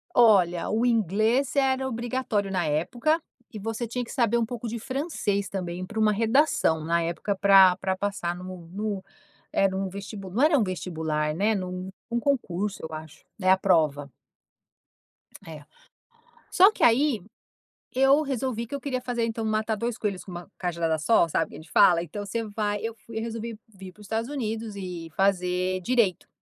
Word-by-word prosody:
Olha, 185 -8 +4
o 225 +3 +1
inglês 225 - +2
era 265 -1 +2
obrigatório 230 -4 -2
na 180 -3 0
época 235 - 0 0.3
e 210 - -6
você 225 +3 -3
tinha 245 +2 -3
que - - -9
saber 235 -3 +2
um 230 - +1
pouco 240 0 -6
de 230 +1 -4
francês 245 - -2
também 180 -1 -4
pra 220 +4 -5
uma 215 -1 +4
redação, 225 - +2
na 170 +1 +1
época 170 +4 -2
pra 195 -1 +7
pra 190 0 -1
passar 190 -3 -2
no 180 -1 -9
no 200 0 -3 0.5
era 195 -1 +2
um 190 0 -2
vestibu 200 0 -7
não 230 +9 +1
era 305 -1 +5
um 240 - +3
vestibular, 160 -4 -2
né, 210 +5 +2
num 185 -1 -4 0.2
num 235 - 0
concurso 210 -7 -1
eu 160 0 -6
acho, 155 -1 -10
né, 185 -2 0
a 190 - +6
prova. 155 -7 +2 1.4
É. 155 -2 -9 0.9
Só 385 +3 +7
que - - -8
aí, 240 -1 +4 0.7
eu 270 +3 +5
resolvi 260 -5 -2
que 280 - -5
eu 280 - -6
queria 255 -2 -2
fazer 240 -2 -1
então 225 0 -3
matar 215 0 0
2 230 +2 -3
coelhos 200 -5 -3
com 185 - -11
uma 175 +2 -8
cajadada 170 -3 -1
só, 170 +2 +4
sabe, 165 0 0
que - - -10
a - - -8
gente 155 - -15
fala? 175 -4 +5
Então 205 +5 -6
você 230 +3 -2
vai 205 -1 -2
eu 225 0 -3
fui 225 -1 -8
eu - - -1
resolvi 230 -1 -5 0.2
vir 190 -1 -10
pros 210 +3 -16
Estados 225 +4 -2
Unidos 225 -5 -4
e 180 -4 -6
fazer 185 -1 +1
direito. 220 -4 +1
205 Hz, 180 wpm, -26 LUFS, 180-235 Hz, 1.4 s, pra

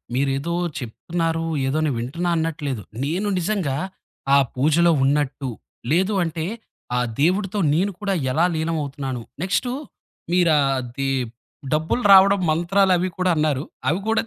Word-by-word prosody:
మీరేదో 140 +5 0 0.3
చెప్తున్నారు, 165 +7 -2 0.2
ఏదో 135 +3 0
నేను 140 -5 0
వింటున్నా 165 +9 -2
అన్నట్లేదు. 150 -8 -2 0.2
నేను 180 +8 -1
నిజంగా, 180 -6 -1 0.6
ఆ - - +7 0.2
పూజలో 155 +6 +3
ఉన్నట్టు, 135 -1 0 0.4
లేదు 190 +6 +2
అంటే, 165 -1 -3 0.5
ఆ - - +1 0.2
దేవుడితో 195 +4 +1 0.2
నేను 190 +5 +1
కూడా 200 -1 0 0.2
ఎలా 165 +6 +3
లీలం 160 +1 -1
అవుతున్నాను, 135 -3 -5 0.2
నెక్స్టు 245 +6 0 0.6
మీరు 175 -2 +4
ఆది 135 -1 -1 0.6
డబ్బులు 160 +10 0
రావడం 195 +1 +7
మంత్రాలవి 185 +2 +2
కూడా 185 0 +1
అన్నారు. 150 -3 +1 0.3
అవి 170 +6 +1
కూడా 225 - +3
165 Hz, 125 wpm, -22 LUFS, 140-185 Hz, 0.6 s, ఆ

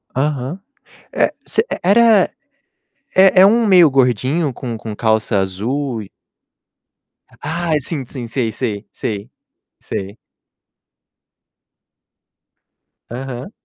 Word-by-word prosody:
Aham. 145 +4 -2 0.5
É - - +1
você - - +1
e - - -5
era 210 0 +5 0.9
é 190 0 +6
é - - +9
um 230 +3 +4
meio 180 -5 +7
gordinho 130 +3 +1
com 120 -3 -5
com 110 -1 -7
calça 110 -1 +1
azul 115 +6 -2
e 95 - -15 1.3
Ah, 165 +2 -2
sim, 140 -1 -5
sim. 120 -2 -7
Sei, 115 -2 -2
sei. 110 -4 -4
Sei. 105 +2 -5 0.5
Sei. 100 +3 -6 2.9
Aham. 130 - -6
130 Hz, 100 wpm, -18 LUFS, 115-170 Hz, 2.9 s, é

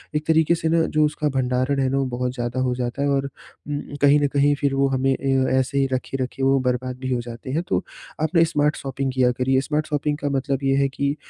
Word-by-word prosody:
एक 150 0 -1
तरीके 160 +1 +3
से 160 -1 -2
ना 165 0 +3 0.2
जो 155 - +5
उसका 150 0 -1
भंडारण 130 +2 0
है 135 - +2
ना 135 - 0
वो 135 - +1
बहुत 125 0 -1
ज़्यादा 120 +1 -3
हो 125 -1 0
जाता 125 +2 -3
है 140 - +1
और 140 0 +1 0.4
उम, 145 0 -2 0.2
कहीं 145 +1 +6
न 145 - +3
कहीं 145 0 +3
फिर 140 -1 +1
वो 135 0 +3
हमें 135 0 +1
अ, 135 -1 +1
ऐसे 130 +2 +1
ही 135 - +3
रखे, 130 +1 -3
रखे 135 +1 -5
वो 135 0 +4
बर्बाद 125 0 -1
भी 130 -1 -4
हो 120 - -1
जाते 120 +1 -9
हैं, 160 +5 -1
तो - - 0 0.4
आप 160 +3 -1
ना 165 - +6
स्मार्ट 150 +1 +2
शॉपिंग 135 0 -3
किया 125 -1 +3
करिए। 130 +1 +2
स्मार्ट 155 0 0
शॉपिंग 150 0 -1
का 145 - -2
मतलब 135 0 -1
ये 135 0 +2
है 140 0 +2
कि 140 +1 -1
135 Hz, 255 wpm, -22 LUFS, 130-145 Hz, 0.4 s, कहीं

